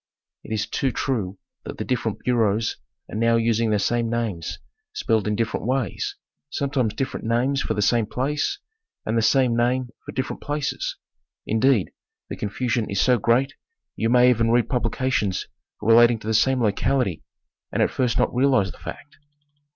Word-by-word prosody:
It - - -11
is 110 -1 0
too 135 +2 -1
true 105 -8 -2 0.3
that - - -7
the - - -4
different 115 -4 -2
bureaus 115 -3 +1 0.3
are - - -8
now 115 +1 +3
using 115 0 +2
the 105 - +2
same 115 +3 0
names 110 -8 -2 0.4
spelled 110 -2 0
in 105 - +1
differ 115 +1 -1
ent - - -6
ways, 130 -6 -1 0.3
sometimes 135 -7 -1
different 135 - -3
names 130 +4 +1
for - - -2
the 105 - +1
same 115 0 +2
place, 145 +6 -1 0.5
and 110 - -1
the 115 - +3
same 125 +1 +3
name 125 +1 +1
for - - -7
different 130 0 -4
places; 145 -1 -3 0.5
indeed, 110 - +2 0.4
the - - -4
confusion 115 +2 -2
is 100 - -1
so 125 +1 +4
great 125 +6 +2 0.4
you 115 - 0
may 125 +1 +6
even 115 -1 +1
read 120 -1 +2
publications 125 -6 0 0.4
relating 115 +1 +6
to 110 - -14
the 110 - 0
same 125 +3 +3
locality 105 - +1 0.5
and - - +2
at - - +1
first 125 -3 0
not - - +1
realize 125 -7 +3
the - - -16
fact. 115 - -9
115 Hz, 170 wpm, -23 LUFS, 110-130 Hz, 0.5 s, may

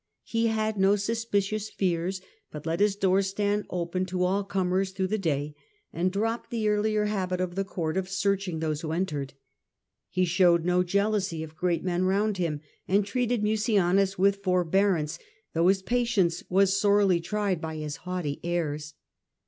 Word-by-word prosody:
He 230 0 0
had 220 -1 0
no 195 +1 +5
suspicious 215 -1 -1
fears, 185 0 -1 0.3
but 150 0 -9
let 165 +2 -1
his 205 -1 +3
doors 195 -1 +2
stand 205 +1 -1
open 180 +1 -2
to 180 0 -1
all 195 +3 +1
comers 190 -1 0
through 190 -1 -1
the 215 +1 0
day, 150 -4 -1 0.4
and 180 +2 0
dropped 225 +4 -2
the 225 -2 -1
earlier 210 0 +1
habit 185 -3 -1
of 180 -1 -2
the 195 +2 -1
court 170 -3 -3
of 190 -1 -2
searching 195 -2 0
those 155 -1 -2
who 160 -1 -3
entered. 150 -6 -2 0.7
He 185 0 +1
showed 170 -1 +3
no 180 0 +3
jealousy 195 -3 0
of 160 0 -10
great 175 0 0
men 180 0 0
round 200 +2 +1
him, 160 -5 -2 0.3
and 200 +2 +2
treated 240 +1 0
Mucianus 200 -3 +2
with 200 +2 +3
forbearance, 180 -3 +1 0.3
though 165 +2 +3
his 190 0 +3
patience 225 -8 +1
was 195 +1 +3
sorely 200 -3 +3
tried 195 -1 -1
by 160 -1 -4
his 150 -1 -5
haughty 180 -6 -4
airs. 155 -3 -2
190 Hz, 165 wpm, -27 LUFS, 175-205 Hz, 0.7 s, no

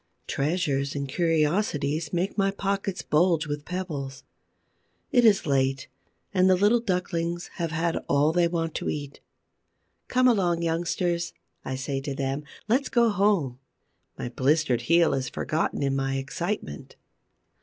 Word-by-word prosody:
Treasures 140 -2 -1
and 140 -1 -2
curiosities 155 -1 0
make 180 +3 -1
my 195 -2 +2
pockets 195 -1 -2
bulge 165 0 +2
with 145 0 -4
pebbles. 150 -7 -5 0.9
It 245 - +4
is 210 -5 +5
late 135 -2 0 0.4
and 185 -1 +4
the 185 - +6
little 205 +6 +4
ducklings 175 -5 -2
have 170 -2 -1
had 165 +1 0
all 145 +2 +4
they 175 0 +3
want 165 -2 -2
to - - -3
eat. 145 -1 -5 0.9
"Come 255 0 +3
along, 180 -8 +2
youngsters," 170 +1 -1 0.3
I 130 - -3
say 135 +1 -3
to 140 0 -4
them, 135 +1 -2 0.2
"let's 255 +6 +2
go 235 -2 +4
home." 195 - +1 0.6
My - - -4
blistered 135 0 +1
heel 170 +6 +4
is 130 -1 -1
forgotten 155 -2 -1
in 135 -1 +1
my 135 0 -1
excitement. 135 - -4
165 Hz, 140 wpm, -26 LUFS, 140-185 Hz, 0.9 s, the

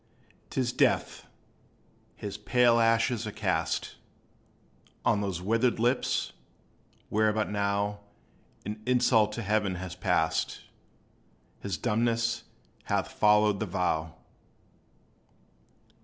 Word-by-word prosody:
'T - - -3
is 120 -1 -1
death! - - +1 0.9
his 100 -1 -6
pale 120 +2 +3
ashes 115 0 +2
are - - -4
cast - - -2 1.1
On 105 - +3
those 95 -3 -3
withered 115 +4 +2
lips, 120 +3 0 0.8
where 110 0 +2
but 110 0 -1
now 100 0 -1 0.7
An 105 +1 -5
insult 120 -4 +3
to 115 - -4
Heaven 105 -1 +1
was 90 0 -6
passed; 80 0 0 1.0
His 100 -5 -3
dumbness 115 +4 0 0.4
hath - - -1
followed 105 -1 +3
the 110 - -2
vow. 80 -4 -1
105 Hz, 100 wpm, -28 LUFS, 100-115 Hz, 1.1 s, pale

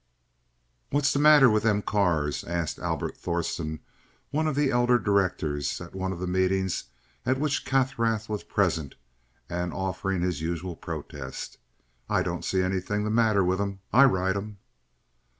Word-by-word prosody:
"What's 145 0 +2
the 140 - +1
matter 150 -2 +8
with 110 -2 +3
them 105 -2 +1
cars?" 85 -8 +1
asked 85 -2 -3
Albert - - -2
Thorsen, 85 -2 -3 0.5
one 155 +2 +1
of 155 - -1
the 145 -1 +2
elder 120 0 +4
directors, 90 - 0
at 85 - -10
one 95 0 -2
of 95 - -4
the 90 - -3
meetings 95 +1 0 0.4
at 130 +1 +1
which 145 -4 0
Kaffrath 115 -5 +1
was 105 -2 -3
present 85 -8 0 0.5
and 90 0 -3
offering 95 0 -2
his 90 -4 -1
usual 85 +2 -3
protest. 65 -4 -7 0.5
"I - - +2
don't - - -3
see 95 -1 +1
anything 95 +3 -1
the 105 - -1
matter 110 -3 +3
with 95 +2 +1
'em. 100 -1 -3
I 135 +4 +8
ride 95 -5 +2
in 100 - -2
em." 105 -1 -10
95 Hz, 160 wpm, -27 LUFS, 90-115 Hz, 0.5 s, matter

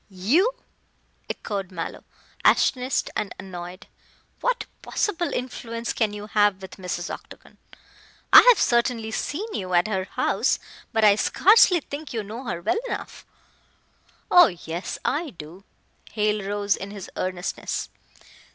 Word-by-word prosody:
"You!" 275 - +2 0.7
echoed 195 -3 -4
Mallow, 170 -3 -6 0.4
astonished 255 +1 +2
and 210 -2 -3
annoyed. 185 +1 -8 0.5
"What - - 0 0.2
possible 350 -4 -1
influence 235 -2 -4
can 220 -3 0
you 210 0 -7
have 205 -2 +2
with 190 -1 -10
Mrs. 180 -2 -4
Octagon. - - -12 0.7
I - - +13
have - - +7
certainly 235 -2 +1
seen 400 - -3
you 185 -2 -2
at 175 +3 +4
her 190 -3 -1
house, - - 0 0.3
but 220 -1 +1
I 210 -1 +8
scarcely 365 - +5
think 290 +1 -8
you 225 -2 -2
know 225 +6 -8
her 180 -6 -4
well 220 - +1
enough - - -6 0.5
" - - -36
"Oh, 355 -1 +9
yes, 175 -2 -5
I 315 +2 0
do." 175 - -12 0.5
Hale 210 -2 0
rose 205 0 +1
in 195 - -7
his 200 -2 -9
earnestness. 185 0 -3
210 Hz, 135 wpm, -24 LUFS, 185-250 Hz, 0.7 s, I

